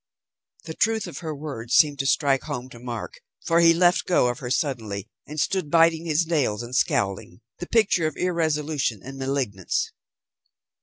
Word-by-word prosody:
The 160 - -7
truth 220 +4 +1
of - - -7
her 160 -3 -5
words 140 -6 -4
seemed 145 -3 +4
to 135 - 0
strike 140 -2 +2
home 125 +1 -5
to 120 - -12
Mark, 120 -2 -6 0.3
for 165 0 +3
he 165 -1 +7
left 175 +1 +3
go 170 -8 +3
of 120 +2 -4
her 125 -4 -5
suddenly, 110 -8 -2 0.2
and 150 +1 -6
stood, 185 -1 0
biting 165 0 +4
his 160 +1 +1
nails 135 -10 0
and 120 +2 -6
scowling, 100 -3 0 0.2
the 175 - -6
picture 195 -8 +2
of 155 - -6
irresolution 155 - -1
and 135 +1 -9
malignance. 130 -9 -2
145 Hz, 170 wpm, -24 LUFS, 125-165 Hz, 0.3 s, he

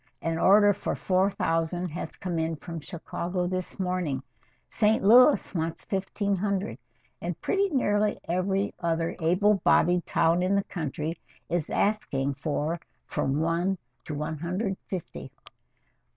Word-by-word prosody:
An 165 0 -1
order 205 +1 +6
for 200 - -3
four 185 +1 +2
thousand 175 -1 -1
has 165 +3 -6
come 175 -3 -3
in 160 0 -1
from 165 +2 -7
Chicago 175 +3 -4
this 185 +1 -3
morning. 180 -8 -1 0.4
St. 215 -2 +2
Louis 250 +8 +6
wants 165 -2 -3
fifteen 200 +1 -1
hundred, 200 +1 -2 0.4
and 170 -1 -4
pretty 395 0 +1
nearly 210 - +1
every 190 +3 0
other 165 -1 -1
able 185 +4 +3
bodied 175 0 +4
town 165 +2 +3
in 185 +2 +2
the 200 - +2
country 160 -1 -4 0.3
is 170 -3 -1
asking 140 -10 0
for 150 +3 -2 0.3
from 135 +2 -1
one 170 +4 +1 0.3
to 150 - -4
one 150 +1 -3
hundred 180 +6 -2
and 190 - -4
fifty." 185 -4 -6
180 Hz, 140 wpm, -27 LUFS, 165-200 Hz, 0.4 s, order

